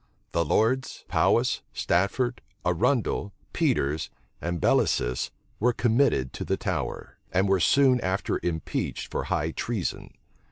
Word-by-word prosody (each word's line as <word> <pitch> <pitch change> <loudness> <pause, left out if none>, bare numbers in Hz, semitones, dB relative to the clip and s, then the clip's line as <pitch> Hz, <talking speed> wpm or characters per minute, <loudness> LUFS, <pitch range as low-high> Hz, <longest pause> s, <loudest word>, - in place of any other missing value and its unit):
The 85 - +2
lords 130 +8 +1
Powis, - - +2
Stafford, 120 +8 0 0.2
Arundel, 100 +3 +1 0.2
Peters, 75 +3 +1 0.3
and 85 0 -2
Bellasis 60 -4 +2 0.3
were 120 +3 +3
committed 115 - +2
to - - -4
the - - -1
Tower, - - -4
and 95 +2 +2
were 95 -1 +3
soon 130 +5 +4
after 95 -1 -1
impeached 80 -2 -3
for - - -2
high 80 +2 0
treason. 105 0 -3
95 Hz, 120 wpm, -27 LUFS, 85-120 Hz, 0.3 s, soon